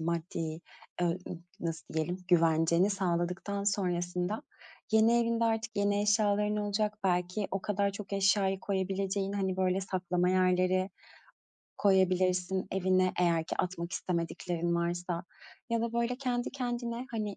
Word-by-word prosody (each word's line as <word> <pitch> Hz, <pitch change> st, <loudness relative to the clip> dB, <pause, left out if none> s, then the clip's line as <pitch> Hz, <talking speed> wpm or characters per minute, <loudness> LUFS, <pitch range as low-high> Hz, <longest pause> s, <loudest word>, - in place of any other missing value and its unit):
maddi, 170 Hz, +1 st, -2 dB
eee, 160 Hz, 0 st, -3 dB, 0.4 s
ııı, 175 Hz, +1 st, +1 dB, 0.4 s
nasıl 165 Hz, -1 st, -4 dB
diyelim, 170 Hz, +3 st, -1 dB
güvenceni 170 Hz, +2 st, +4 dB
sağladıktan 190 Hz, +1 st, -1 dB
sonrasında 180 Hz, +2 st, -1 dB, 0.5 s
yeni 225 Hz, +2 st, +5 dB
evinde 230 Hz, 0 st, +1 dB
artık 225 Hz, 0 st, -1 dB
yeni 205 Hz, 0 st, +2 dB
eşyaların 210 Hz, 0 st, +2 dB
olacak, 210 Hz, 0 st, -1 dB
belki 180 Hz, +2 st, 0 dB
o 195 Hz, 0 st, -2 dB
kadar 200 Hz, -1 st, +1 dB
çok 200 Hz, 0 st, -8 dB
eşyayı 195 Hz, -1 st, +2 dB
koyabileceğin, 195 Hz, 0 st, -1 dB
hani, 190 Hz, -2 st, -1 dB
böyle, 185 Hz, 0 st, +1 dB
saklama 180 Hz, -1 st, 0 dB
yerleri 185 Hz, +1 st, +2 dB, 0.9 s
koyabilirsin 185 Hz, -1 st, +2 dB
evine 185 Hz, -1 st, +2 dB
eğer 170 Hz, -2 st, +2 dB
ki -, -, -4 dB
atmak 175 Hz, -1 st, -2 dB
istemediklerin 170 Hz, 0 st, -2 dB
varsa. 175 Hz, 0 st, -2 dB, 0.5 s
Ya 230 Hz, -1 st, +1 dB
da, 235 Hz, 0 st, -2 dB
böyle, 235 Hz, +1 st, 0 dB
kendi 250 Hz, -2 st, -1 dB
kendine, 240 Hz, -1 st, -3 dB
hani, 210 Hz, -3 st, -3 dB
190 Hz, 130 wpm, -31 LUFS, 180-205 Hz, 0.9 s, yeni